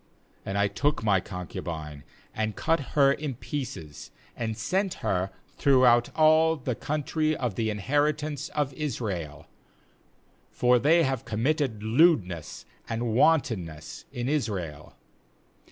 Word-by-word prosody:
6And 95 - -3
I 100 0 +3
took 140 +7 -1
my 100 -4 +3
concu 90 -1 -7
bine, 75 -4 -6 0.3
and 110 -1 -2
cut 165 0 +1 0.2
her 140 -1 +6
in 145 -3 -4
pieces, 115 - -6 0.3
and 110 -2 -3
sent 185 - -1
her 95 0 0 0.3
throughout 125 -3 +4
all 160 +1 +5
the 130 -4 -3
country 155 +4 -1
of 125 -5 -2
the 110 +2 -1
inheritance 145 +6 -1
of 145 -2 -2
Israel; 100 - -4 1.0
for 125 0 +3
they 165 +6 +4
have 135 -4 -1
committed 120 -1 -1
lewdness 110 - +2 0.2
and 115 0 -2
wantonness 110 - +1
in 120 0 -4
Israel. 95 - -3
120 Hz, 120 wpm, -27 LUFS, 100-150 Hz, 1.0 s, her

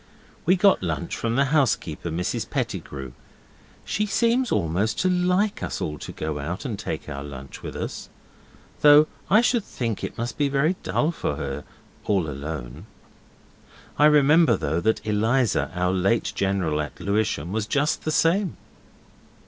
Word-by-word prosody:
We 185 - +6
got 195 +1 +4
lunch 85 -3 -3
from 115 0 -2
the 140 +2 +3
housekeeper, 105 - +1
Mrs 85 +2 -2
Pettigrew. 65 -3 -4 0.7
She 210 +2 -1
seems 235 +5 +1
almost 95 +7 0
to 185 - +2
LIKE 180 +3 +1
us - - -3
all 75 -1 -4
to - - -7
go 75 -1 -4
out 85 - -5
and 110 -7 -4
take 80 -7 -5
our 70 -2 -5
lunch 70 -2 -9
with - - -7
us. - - -5 0.7
Though 150 +1 +8 0.2
I 215 +4 +6
should 240 -2 +2
think 115 - -4
it - - -5
must 120 +5 -4
be 145 -1 +2
very 150 +6 +2
dull 155 - 0
for 75 - -3
her - - -5 0.4
all 95 -6 +1
alone. 75 - -6 1.1
I 150 - +7
remember, 150 +2 +5
though, 80 +4 -1
that 110 +3 0
Eliza, 110 +3 +1
our 90 +1 +1
late 95 +5 +1
general 95 -6 0
at 75 - -7
Lewisham, 100 -6 -1
was 110 0 -2
just 145 +5 0
the - - -2
same. 170 +4 +2
110 Hz, 155 wpm, -24 LUFS, -, 1.1 s, Though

